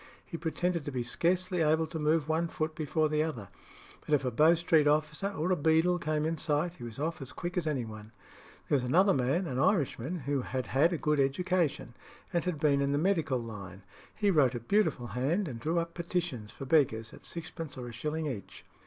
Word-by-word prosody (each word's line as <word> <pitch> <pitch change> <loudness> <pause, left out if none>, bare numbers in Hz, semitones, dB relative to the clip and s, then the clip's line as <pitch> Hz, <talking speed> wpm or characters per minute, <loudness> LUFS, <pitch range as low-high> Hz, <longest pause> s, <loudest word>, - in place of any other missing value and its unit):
He 170 - -8
pretended 170 +1 -1
to 145 - -3
be 125 -2 -2
scarcely 180 +7 0
able 160 +1 +3
to 160 0 -6
move 155 0 +2
one 160 +2 +1
foot 155 -1 -3
before 155 0 0
the 150 0 +1
other; 125 - -3 0.5
but 150 - +2
if 140 - -1
a 125 - 0
Bow 155 +8 +5
Street 160 -3 +3
officer 155 +6 +1
or 180 -1 -1
a - - +4
beadle 160 +3 +3
came 155 -1 -1
in 160 0 -1
sight, 160 +3 0
he 120 - -10
was 115 -2 -7
off 160 +2 -3
as 135 - -7
quick 175 +1 -5
as 175 -4 -1
any 135 -6 -1
one. 110 0 -10 0.6
There - - +2
was 130 - +1
another 185 +10 +4
man, 135 +8 +1
an 130 -6 -3
Irishman 165 - +1
who 140 0 -1
had 130 0 -3
had 145 +7 +3
a 170 - 0
good 150 -1 +1
education, 145 -2 0 0.4
and 170 - +1
had 180 -5 -2
been 145 -2 +3
in 140 0 +1
the - - +2
medical 165 -5 +1
line; 100 -5 -8 0.3
he 205 -2 +2
wrote 135 -7 +3
a - - -2
beautiful 160 - +1
hand, 160 +10 0
and 120 -5 -6
drew 160 +7 -1
up 170 0 -1
petitions 170 - -3
for 135 - -8
beggars 120 -7 +2
at - - -13
sixpence 165 -3 -6
or 125 -1 -6
a - - -7
shilling 155 +7 -3
each. 120 -10 -6
155 Hz, 220 wpm, -30 LUFS, 130-170 Hz, 0.6 s, Bow